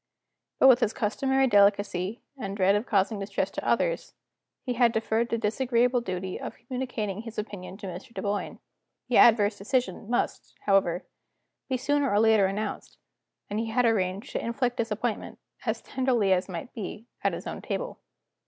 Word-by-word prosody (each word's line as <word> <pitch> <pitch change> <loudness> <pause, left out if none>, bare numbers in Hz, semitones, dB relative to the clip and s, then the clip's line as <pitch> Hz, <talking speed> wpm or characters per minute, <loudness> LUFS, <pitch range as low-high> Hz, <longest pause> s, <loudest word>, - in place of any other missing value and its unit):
But, - - +6
with 255 -2 +8
his 215 - +1
customary 265 +4 +1
delicacy, 205 -2 +2
and 200 -6 -5
dread 195 0 +4
of 205 +4 0
causing 205 0 +1
distress 200 0 -2
to - - -5
others, - - 0 0.5
he 250 - -1
had 240 -1 +4
deferred 225 +1 0
the 230 - 0
disagreeable 240 +2 +1
duty 185 -3 -4
of - - -7
communicating 235 -5 -4
his 230 -1 -9
opinion 200 -3 -6
to 205 - -9
Mr. 190 +7 -7
Dunboyne. 205 -3 -3 0.5
The 245 - +3
adverse 215 -3 +5
decision 210 -2 -1
must, 240 - -2
however, 190 -3 +2 0.6
be 260 - +1
sooner 285 +2 +1
or 205 - +3
later 220 -3 +5
announced; 210 +2 -4 0.5
and 205 +1 -2
he 225 - -1
had 245 +2 +2
arranged 195 -3 0
to - - -3
inflict 240 +1 -1
disappointment, 225 0 -2 0.3
as - - -1
tenderly 245 -7 +2
as 185 +1 0
might 175 +6 -6
be, 215 0 -6 0.2
at - - +2
his - - -6
own - - -5
table. - - -4
220 Hz, 165 wpm, -27 LUFS, 200-245 Hz, 0.6 s, with